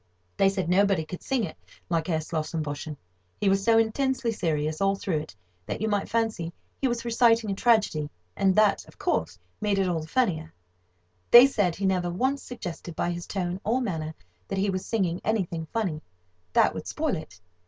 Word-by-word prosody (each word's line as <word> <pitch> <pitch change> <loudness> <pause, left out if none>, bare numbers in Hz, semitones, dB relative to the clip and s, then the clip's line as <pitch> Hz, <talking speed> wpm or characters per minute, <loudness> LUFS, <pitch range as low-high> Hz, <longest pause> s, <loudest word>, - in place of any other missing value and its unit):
They 195 - +4
said 195 -3 -2
nobody 190 -2 +3
could 180 +3 -7
sing 265 -4 0
it 165 - -4 0.3
like 165 -2 0
Herr 165 -3 +1
Slossenn 155 0 -3
Boschen; 145 +1 -5 0.4
he 205 - +2
was 195 0 +2
so 230 +1 +5
intensely 240 +2 +1
serious 155 -5 -1
all 195 0 +3
through 185 -5 -1
it 150 -6 -9 0.3
that 105 - -3
you 220 - 0
might 205 -2 0
fancy 220 -7 -1 0.3
he 270 - +3
was 240 -1 -2
reciting 230 -2 +3
a - - +1
tragedy, 200 -9 +2 0.3
and 190 -1 +3
that, 210 -2 +4
of - - -17
course, 85 +2 -1 0.2
made 205 -1 +1
it 195 -1 +2
all 175 -2 0
the 155 - -7
funnier. 165 -9 0 0.7
They 240 +2 +11
said 205 -10 +1
he 195 - -3
never 180 -2 +1
once 260 +10 0
suggested 175 -8 -7
by 175 - 0
his 175 0 -5
tone 185 -1 -3
or 235 +4 +1
manner 160 -10 -3 0.3
that - - -3
he 195 +1 +1
was 185 -1 -3
singing 185 -6 0
anything 175 -7 -1
funny—that 90 - -1
would - - -6
spoil - - -1
it. 90 - -9
190 Hz, 190 wpm, -27 LUFS, 160-220 Hz, 0.7 s, They